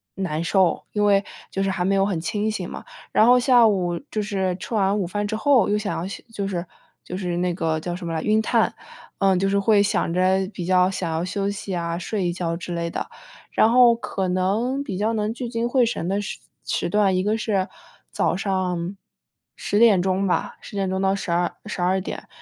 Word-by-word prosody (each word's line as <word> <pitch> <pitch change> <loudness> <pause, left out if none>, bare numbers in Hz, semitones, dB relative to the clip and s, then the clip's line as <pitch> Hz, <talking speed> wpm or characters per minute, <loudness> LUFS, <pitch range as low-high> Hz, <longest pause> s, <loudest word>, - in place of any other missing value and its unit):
难 170 -4 -2
受， 185 -1 +2
因 210 -1 +1
为 200 -1 +4 0.3
就 195 - -2
是 195 - 0
还 180 -1 -1
没 195 +1 +2
有 195 0 +3
很 190 -5 -1
清 210 +6 -1
醒 185 -4 -4
嘛。 - - -8 0.3
然 215 - +5
后 250 +1 +6
下 245 -2 +5
午 180 -5 +1
就 215 - -1
是 190 -3 -1
吃 230 - -7
完 200 0 +2
午 180 - -1
饭 205 +3 -2
之 215 +1 -2
后， 255 -4 +3
又 210 - +2
想 210 -1 -3
要 170 - -3
休 195 - -7
就 200 -2 -3
是 180 -2 -3 0.4
就 180 - -6
是 180 -2 -2
那 180 0 0
个 160 -2 -1
叫 175 +2 -4
什 180 - -7
么 165 - -3
来 160 - -1
晕 215 +1 +3
碳， - - +1 0.5
嗯， 195 -2 +3
就 195 - +1
是 200 +1 +1
会 200 +1 +4
想 185 -4 0
着 190 +1 +2
比 175 - -5
较 185 +1 +3
想 180 -3 -3
要 160 +1 -1
休 195 +2 -2
息 200 -1 -5
啊， 170 -1 -2
睡 190 0 -2
一 175 - -1
觉 170 -2 -2
之 175 0 -6
类 170 0 -2
的。 - - -4 0.4
然 220 - +4
后 240 -1 +6
可 215 -6 -3
能 210 +9 0
比 200 -10 -5
较 220 +3 0
能 215 0 -1
聚 240 +1 -5
精 235 0 -2
会 250 -2 +3
神 190 -6 -2
的 200 +1 0
时 205 - -5 0.3
时 170 - -1
段， 200 -1 +3
一 185 - +1
个 215 +2 +1
是 200 -3 -1 0.4
早 - - +1
上 185 -1 -2 0.6
10 205 - -1
点 215 -6 +6
钟 190 +1 0
吧， 180 - -1
10 - - -11
点 195 -1 0
钟 190 +1 -1
到 195 0 +2
12 175 -2 -1
12 190 -2 0
点， - - -7
195 Hz, 235 characters per minute, -23 LUFS, 180-210 Hz, 0.6 s, 后